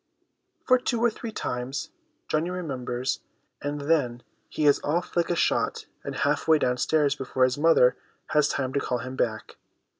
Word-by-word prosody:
For 255 -1 +5
two 245 -1 -1
or 235 0 +3
three 225 +1 -7
times 135 - -4 0.4
Johnny 155 +3 0
remembers; 130 -8 -3 0.4
and 145 0 -3
then, 140 -6 +1 0.3
he 155 - -1
is 145 - +5
off 170 +4 -1
like 170 -1 +2
a 175 - +1
shot - - +1 0.2
and - - -5
half - - 0
way 160 -1 +6
downstairs 145 +2 +2
before 130 -2 -1
his 130 +2 +2
mother 150 -6 +5 0.3
has 150 -1 +3
time 130 -1 -2
to 140 - +2
call 125 -2 -1
him 130 +2 -6
back. 110 -4 -2
145 Hz, 170 wpm, -26 LUFS, 130-165 Hz, 0.4 s, way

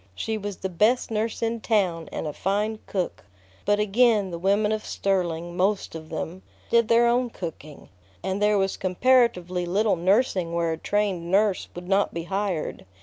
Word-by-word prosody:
She 220 - -2
was 205 -2 -5
the - - -3
best 215 +8 +2
nurse 220 +1 -2
in 230 0 -1
town 185 -8 0
and - - -4
a 150 - -3
fine 210 +5 -1
cook. 185 -3 -3 0.4
But 205 0 +2
again 210 -2 +3
the 170 - -5
women 200 +3 +2
of 215 0 -1
Sterling, 175 -3 -1
most 195 +2 0
of 160 -1 -8
them, 165 +3 -5 0.3
did 235 -1 +4
their 235 +1 +5
own 240 +1 +2
cooking, 160 -7 -8 0.3
and 190 +2 -2
there 210 0 +4
was 195 -1 0
comparatively 185 -3 +2
little 200 +4 +1
nursing 185 -1 +1
where 170 -1 0
a 160 - -2
trained 195 -4 -1
nurse 200 +1 +2
would 175 0 -8
not 195 -1 +1
be 170 - -3
hired. 190 -2 -2
195 Hz, 175 wpm, -25 LUFS, 175-215 Hz, 0.4 s, their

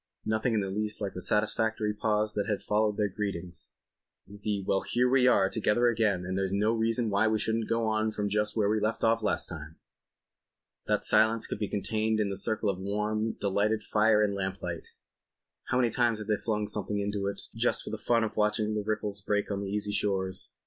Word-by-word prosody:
Nothing 110 +2 0
in 105 - +2
the 95 -1 -3
least 105 +1 -2
like 100 -2 -3
the 90 - -6
satisfactory 105 +1 0
pause 105 0 0
that 100 -1 -2
had 105 - -2
followed 105 0 +1
their 105 - +2
greetings—the 100 +1 -6
"Well, 95 - +1
here 125 +1 +1
we 130 0 +4
are 100 -6 +4
together 110 +3 +2
again, 105 -6 +1
and 95 +1 -3
there's 95 -1 -1
no 105 +3 +2
reason 115 0 +1
why 100 +3 +3
we 110 0 +2
shouldn't 110 +1 -1
go 115 0 +1
on 110 0 +1
from 105 -1 -2
just 105 +1 0
where 105 -2 +3
we 110 +1 +2
left 110 +2 -1
off 115 0 +3
last 105 - 0
time." 80 -2 -8 1.1
That - - +1
silence 110 +1 +3
could - - -5
be 105 - -1
contained 110 +2 -1
in 105 -2 +1
the 100 - -3
circle 110 -1 0
of 95 - -7
warm, 105 +3 -1
delightful 100 +2 +1
fire 105 0 +4
and 100 -1 +1
lamplight. 95 -3 -4 0.8
How 125 - 0
many 120 -2 +2
times 120 -2 +2
hadn't 105 0 -1
they - - -10
flung 105 -2 -1
something 105 0 -2
into 100 -1 -2
it 100 0 -3
just - - +1
for - - -6
the - - -4
fun 115 -1 +2
of 110 - -3
watching 105 0 +1
the 105 - -1
ripples 105 -1 -2
break 105 +1 -1
on 100 - -1
the 100 -1 -4
easy 105 0 0
shores. 95 -2 -1
105 Hz, 210 wpm, -29 LUFS, 100-110 Hz, 1.1 s, we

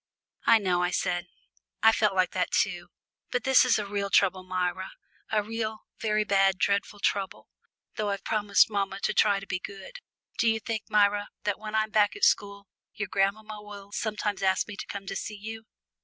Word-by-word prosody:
"I 230 - +8
know," 185 -4 +1
I 180 - +1
said, 180 0 -1 0.6
"I've 225 0 +7
felt 210 -3 +2
like 185 -1 +2
that - - -1
too. - - 0 0.4
But 485 - -1
this 265 -1 +6
is 255 -2 +3
a 210 - -2
real 200 0 -2
trouble, 190 -2 +3
Myra 185 0 -2 0.4
a 215 -1 +2
real, 220 0 -4 0.2
very 215 -1 +1
bad, 195 -2 +3
dreadful 200 +1 0
trouble, 195 -1 -2 0.5
though 210 -2 -1
I've 200 -1 -3
promised 205 -2 +3
mamma 200 -2 -2
to - - 0
try 205 -2 +3
to 195 - -10
be 180 - -3
good. 200 - -9 0.4
Do 230 - +4
you 225 0 +1
think, 220 -1 -4
Myra, 205 0 +3
that 205 -1 -1
when 215 0 -6
I'm 215 0 +1
back 210 -1 +3
at 410 - -9
school 200 0 +2 0.3
your 210 -2 -4
grandmamma 210 +2 -1
will 200 -1 -11
sometimes 210 -2 -2
ask 190 -1 +2
me 210 - -7
to - - -7
come 200 -1 -6
to - - -5
see 215 - -5
you?" 220 +2 -7
205 Hz, 195 wpm, -27 LUFS, 195-215 Hz, 0.6 s, I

